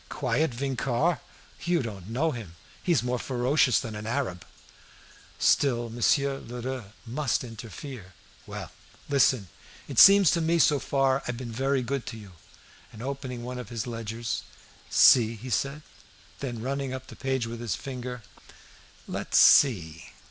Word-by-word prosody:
Quiet 145 +4 0
Vincart! 135 +4 0 0.4
You 170 -4 +1
don't 100 -4 -7
know 145 +8 0
him; 105 - -8 0.3
he's 165 -10 +2
more 125 0 -1
ferocious 125 +1 +2
than 110 -2 -6
an 105 +1 -6
Arab!" 115 - -2 0.9
Still 120 -4 +2
Monsieur 135 +4 +1
Lheureux 125 0 -6 0.2
must 130 +2 -1
interfere. 115 - -9 0.3
"Well, - - -7 0.4
listen. 130 -7 +3 0.4
It - - 0
seems 195 -5 +9
to 170 - +1
me 165 +1 +2
so 150 -3 +4
far 135 0 +1
I've 125 - -3
been 120 -2 -6
very 135 +2 0
good 135 +1 -3
to 115 - -6
you." 105 -3 -12 0.6
And 110 +1 -10
opening 130 -3 -5
one 125 +1 -5
of 125 - -8
his 115 -3 -4
ledgers, 115 -1 -4 0.5
"See," 115 -2 +6
he 125 +4 -8
said. 140 +9 -1 0.6
Then 120 -5 -5
running 135 0 -2
up 130 0 -8
the - - -12
page 130 -3 -1
with 115 0 -6
his 120 -3 -2
finger, 125 -3 -6 0.8
"Let's - - -1
see! 90 - +4
125 Hz, 150 wpm, -27 LUFS, 115-140 Hz, 0.9 s, seems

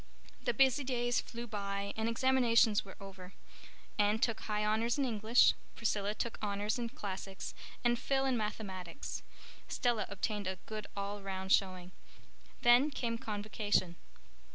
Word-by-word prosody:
The - - +1
busy 270 +1 +4
days 245 -2 +1
flew 235 0 -7
by 200 -2 -3
and 220 +1 0
examinations 230 -3 +4
were 195 - -11
over. 195 -2 -10 0.7
Anne 205 +1 +4
took 230 -1 +1
High 210 -1 -1
Honors 225 +4 +1
in 280 - +2
English. 225 0 +4 0.2
Priscilla 210 -2 0
took 235 +1 -3
Honors 205 +2 -1
in 235 -1 -2
Classics, 195 -2 -6 0.3
and 240 -1 +3
Phil 270 -1 +1
in 265 -2 +2
Mathematics. 210 -1 -4 0.5
Stella 235 -5 0
obtained 205 0 -2
a 190 - -1
good 215 -1 -5
all 200 +1 -3
round 190 -1 -4
showing. 185 -2 +2 0.7
Then 245 +5 +6
came 235 -5 -2
Convocation. 205 -4 0
215 Hz, 140 wpm, -34 LUFS, 200-240 Hz, 0.7 s, Then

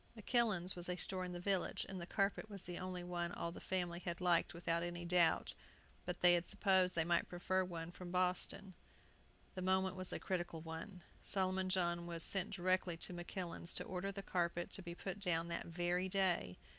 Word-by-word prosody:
"Makillan's" 215 -5 +2
was 175 0 +1
a 180 - 0
store 185 0 -3
in 180 - -4
the 175 - -5
village, 190 0 0
and 190 -2 -5
the 170 - -6
carpet 200 +2 0
was 200 -3 -7
the 175 0 -5
only 185 -1 -4
one 175 -1 -2
all 170 - -3
the - - -9
family 175 -2 -1
had 175 -1 -4
liked 175 -2 +3
without 170 0 -1
any 175 0 -3
doubt; 170 -1 +3 0.5
but - - -3
they 175 0 +8
had 175 0 +2
supposed 190 -3 +3
they 165 - +3
might 170 0 +2
prefer 185 +1 +1
one 170 -2 -5
from 180 0 -8
Boston. 185 +1 0 0.8
The 185 - -5
moment 190 0 +2
was 185 -1 0
a - - -1
critical 175 -3 -2
one. 165 +3 -7 0.2
Solomon 185 -1 +1
John 175 -2 +1
was 170 -1 +1
sent 195 0 +2
directly 185 -2 +1
to 180 - -1
Makillan's 175 0 -2
to - - -1
order 190 +2 -3
the 195 0 -6
carpet 175 -2 -1
to - - -4
be 170 -1 -6
put 190 +2 -5
down 170 -3 0
that 170 - -3
very 175 +2 0
day. 185 - +1
180 Hz, 200 wpm, -39 LUFS, 175-190 Hz, 0.8 s, they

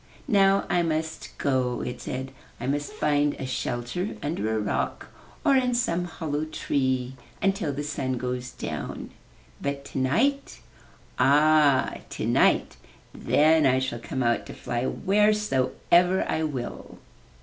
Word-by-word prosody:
*'Now 195 -1 +4
I 175 - +2
must 160 -1 -3
go/' 130 -3 0
it 125 0 -5
said. 130 +1 -5 0.3
''I - - -4
must 145 +1 -1
find 145 -1 +1
a 135 - -5
shelter 130 - -3
under 110 -8 -1
a - - 0
rock 105 -1 -2 0.4
or 280 -3 +5
in 250 -2 +2
some 175 -7 0
hollow 155 -3 -3
tree 130 -4 -1 0.2
until 195 -6 0
the 145 +1 -4
sun 140 -3 -2
goes 125 0 -3
down. - - -6 0.5
But 140 0 -3
tonight 230 - 0 0.3
— - - -24
ah, 150 -1 +4
tonight! - - +2 0.4
Then 155 -1 +3
I 130 0 +3
shall 130 -2 -2
come 130 +2 -3
out 120 0 +1
to - - -8
fly 120 +1 -2
wheresoever 190 -3 +2
I 160 - 0
will.' 135 -5 -6
145 Hz, 135 wpm, -26 LUFS, 130-175 Hz, 0.5 s, or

